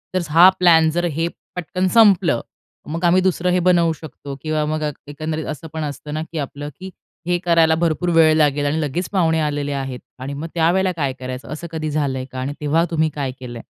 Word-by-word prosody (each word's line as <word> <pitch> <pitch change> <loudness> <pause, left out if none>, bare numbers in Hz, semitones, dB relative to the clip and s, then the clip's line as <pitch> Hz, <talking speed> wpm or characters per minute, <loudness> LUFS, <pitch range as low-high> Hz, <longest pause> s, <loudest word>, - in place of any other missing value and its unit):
जर, 185 - +2
हा 170 +4 +8
प्लॅन 165 -3 +5
जर 175 +2 -1
हे 165 +1 -1 0.3
पटकन 185 +2 -1
संपलं 195 - +5 0.5
मग 165 +3 -4
आम्ही 180 +2 +4
दुसरं 180 -1 +1
हे 180 - +2
बनवू 170 -2 +3
शकतो 145 -3 -9
किंवा 155 -1 -1
मग 155 0 -2 0.2
एकंदरीत 155 +2 -4
असं 155 +3 -10
पण 160 - -3
असतं 150 0 -6
ना, 155 - -2
की 165 0 -9
आपलं, 145 +1 -5
की 190 0 -8 0.4
हे 175 0 +2
करायला 165 -2 +4
भरपूर 170 +1 0
वेळ 160 -1 +6
लागेल 145 -1 +2
आणि 155 +3 0
लगेच 160 +5 -2
पाहुणे 165 -4 +2
आलेले 145 -1 -2
आहेत. 135 -2 -4 0.2
आणि 135 +2 -5
मग 145 +4 -5
त्यावेळेला 180 +3 +2
काय 140 -4 -1
करायचं 130 0 -6
असं 170 +3 -7
कधी 155 -1 -3
झालंय 135 -3 -1
का? 130 - -6
आणि 135 +3 -3
तेव्हा 160 +3 +2
तुम्ही 160 -1 +1
काय 140 -3 -2
केलं 120 -2 -8
आहे? - - -13
160 Hz, 210 wpm, -20 LUFS, 145-170 Hz, 0.5 s, हा